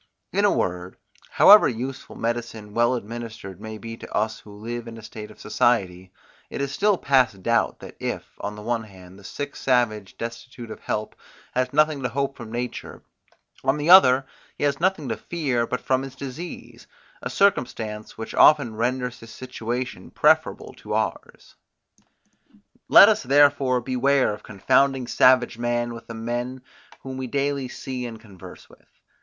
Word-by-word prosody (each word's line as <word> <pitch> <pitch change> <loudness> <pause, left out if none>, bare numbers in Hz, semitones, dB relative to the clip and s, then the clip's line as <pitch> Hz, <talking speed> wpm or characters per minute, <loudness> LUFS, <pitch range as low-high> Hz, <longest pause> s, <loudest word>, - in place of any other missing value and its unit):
In - - +2
a - - +4
word, 90 +1 -2 0.3
however 210 +1 +7
useful 130 +3 -6
medicine 115 -2 -4
well 120 +2 +2
administered 110 -4 -7
may 110 0 -7
be 115 +1 -8
to - - -11
us 110 0 -1
who 105 - -15
live 115 +3 -6
in 115 0 -8
a 110 - -11
state 105 0 -9
of 105 - -16
society, 95 -5 0 0.4
it - - -6
is 140 -1 -2
still 205 +2 +2
past 130 - +2
doubt, 115 +2 +1
that - - -11
if, - - -3 0.2
on 105 +1 -5
the 105 - -10
one 115 0 -2
hand, 95 -2 -15
the - - -16
sick 145 +8 -6
savage, 110 -6 0
destitute 115 0 -7
of - - -8
help, 105 0 -4 0.4
has 125 0 0
nothing 150 -1 +2
to 125 - -1
hope 140 +2 -2
from 115 -3 -10
nature, 120 0 -5 0.6
on 135 +2 +2
the 150 +4 +2
other, 135 -8 +8 0.3
he - - -4
has 140 -1 +1
nothing 175 -5 0
to - - -1
fear 135 -9 -2
but 125 - -2
from 130 0 +1
his 135 -1 -8
disease; 140 +6 -8 0.3
a - - -4
circumstance, 110 - 0
which 110 - -6
oftens 140 -7 +5
renders 125 +2 -2
his 115 - -12
situation 125 0 -5
preferable - - +2
to - - -8
ours. - - -4 1.3
Let - - +9
us - - +3
therefore 135 -2 +3
beware 130 0 +1
of 105 - -9
confounding 130 +6 +1
savage 125 -1 +3
man 120 0 -1
with 115 0 -11
the 115 - -7
men, 120 +3 -4 0.4
whom 130 -1 -7
we 130 -1 -4
daily 140 0 -1
see 125 -1 -6
and 115 -2 -9
converse 100 -5 -13
with. - - -21
120 Hz, 170 wpm, -24 LUFS, 110-135 Hz, 1.3 s, Let